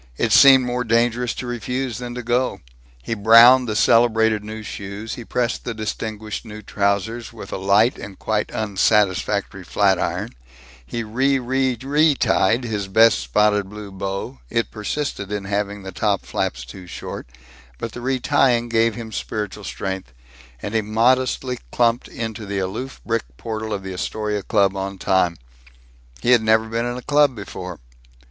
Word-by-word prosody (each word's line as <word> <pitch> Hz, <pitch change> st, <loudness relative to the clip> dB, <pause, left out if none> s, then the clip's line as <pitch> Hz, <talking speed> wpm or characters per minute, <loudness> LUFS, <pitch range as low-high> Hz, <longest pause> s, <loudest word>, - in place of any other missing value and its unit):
It -, -, 0 dB
seemed 135 Hz, -2 st, +8 dB
more 125 Hz, 0 st, -1 dB
dangerous 120 Hz, +1 st, +1 dB
to -, -, -5 dB
refuse 120 Hz, 0 st, -3 dB
than 120 Hz, -1 st, -6 dB
to 125 Hz, -, -5 dB
go. 125 Hz, +2 st, 0 dB, 0.4 s
He 115 Hz, -, -3 dB
browned 115 Hz, +4 st, +7 dB
the 105 Hz, -, -1 dB
celebrated 110 Hz, -2 st, +3 dB
new 110 Hz, +1 st, -7 dB
shoes; 105 Hz, +1 st, -6 dB
he 120 Hz, -, -7 dB
pressed 125 Hz, +1 st, -2 dB
the 120 Hz, -, -4 dB
distinguished 110 Hz, 0 st, -4 dB
new 110 Hz, -1 st, -10 dB
trousers, 100 Hz, +4 st, -1 dB
with 110 Hz, -4 st, -10 dB
a -, -, -2 dB
light 100 Hz, +5 st, +3 dB
and 100 Hz, -1 st, -9 dB
quite 105 Hz, -1 st, -1 dB
unsatisfactory 100 Hz, -2 st, +1 dB
flatiron; 95 Hz, +1 st, 0 dB, 0.5 s
he 115 Hz, -, -4 dB
re 130 Hz, +5 st, +1 dB
re 130 Hz, 0 st, 0 dB
retied 135 Hz, -5 st, +2 dB
his 105 Hz, -4 st, -3 dB
best 110 Hz, -2 st, +5 dB
spotted 100 Hz, -, +1 dB
blue 105 Hz, -1 st, -9 dB
bow 100 Hz, +6 st, -5 dB
it 115 Hz, 0 st, -1 dB
persisted 105 Hz, -2 st, -4 dB
in 105 Hz, -1 st, -3 dB
having 100 Hz, 0 st, -2 dB
the 95 Hz, -, -7 dB
top 100 Hz, +1 st, 0 dB
flaps -, -, -3 dB
too 90 Hz, +8 st, -11 dB
short, 85 Hz, -, -7 dB, 0.5 s
but 115 Hz, -, -5 dB
the 120 Hz, -, -8 dB
retying 125 Hz, -1 st, +2 dB
gave 115 Hz, -1 st, +2 dB
him 115 Hz, -2 st, -7 dB
spiritual 105 Hz, -1 st, -4 dB
strength 95 Hz, -9 st, -5 dB, 0.5 s
and 105 Hz, -, -4 dB
he 110 Hz, -, +2 dB
modestly 125 Hz, +3 st, +1 dB
clumped 120 Hz, 0 st, +1 dB
into 110 Hz, -2 st, -6 dB
the 100 Hz, 0 st, -3 dB
aloof 105 Hz, +8 st, -4 dB
brick 110 Hz, -, -3 dB
portal 110 Hz, -1 st, -5 dB
of 100 Hz, -2 st, -3 dB
the 95 Hz, -1 st, -6 dB
Astoria 105 Hz, +3 st, -2 dB
Club 100 Hz, -1 st, +2 dB
on 95 Hz, 0 st, -4 dB
time. 95 Hz, -3 st, +1 dB, 0.9 s
He 120 Hz, -, +3 dB
had 120 Hz, -2 st, +6 dB
never 110 Hz, 0 st, +3 dB
been 115 Hz, +1 st, -2 dB
in 120 Hz, 0 st, -3 dB
a 125 Hz, -, -8 dB
club 145 Hz, -3 st, +3 dB
before. 90 Hz, -4 st, -7 dB
110 Hz, 160 wpm, -21 LUFS, 100-120 Hz, 0.9 s, seemed